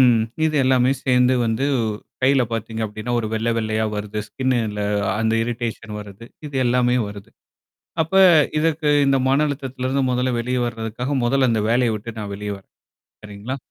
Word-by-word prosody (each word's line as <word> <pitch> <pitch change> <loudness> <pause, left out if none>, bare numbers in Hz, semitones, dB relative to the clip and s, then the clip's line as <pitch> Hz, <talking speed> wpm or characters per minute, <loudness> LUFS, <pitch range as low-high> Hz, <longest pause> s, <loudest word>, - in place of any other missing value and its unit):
ம். 120 -3 +5 0.2
இது 155 -1 +1
எல்லாமே 130 -1 +3
சேர்ந்து 125 -1 +3
வந்து 115 +4 0 0.6
கையில 135 0 +4
பாத்தீங்க 115 0 -4
அப்படின்னா, 110 +3 -5
ஒரு 110 - -3
வெள்ளை 110 +1 0
வெள்ளையா 110 0 -1
வருது 105 +1 -4
ஸ்கின்ல 115 -6 -1 0.4
அந்த 110 0 +1
இரிடேஷன் 115 -2 -4
வருது. 105 +2 -11 0.2
இது 145 - -10
எல்லாமே 125 0 +2
வருது. 100 -1 -10 0.7
அப்ப 160 +4 -2 0.4
இதற்கு 155 -1 +1 0.2
இந்த 135 0 +3
மன 140 +3 +3
அழுத்தத்துல 135 -3 -5
இருந்து 135 +1 +1
மொதல்ல 125 0 0
வெளிய 125 +1 -1
வர்றதுக்காக 115 +4 -3
மொதல்ல 130 +1 +2
அந்த 110 -2 +1
வேலையை 120 -1 +2
விட்டு 110 +1 -8
நான் 105 -1 -5
வெளிய 105 0 -5
வரேன். 95 - -22 0.5
சரிங்களா? 105 +6 -6
120 Hz, 160 wpm, -21 LUFS, 110-130 Hz, 0.7 s, ம்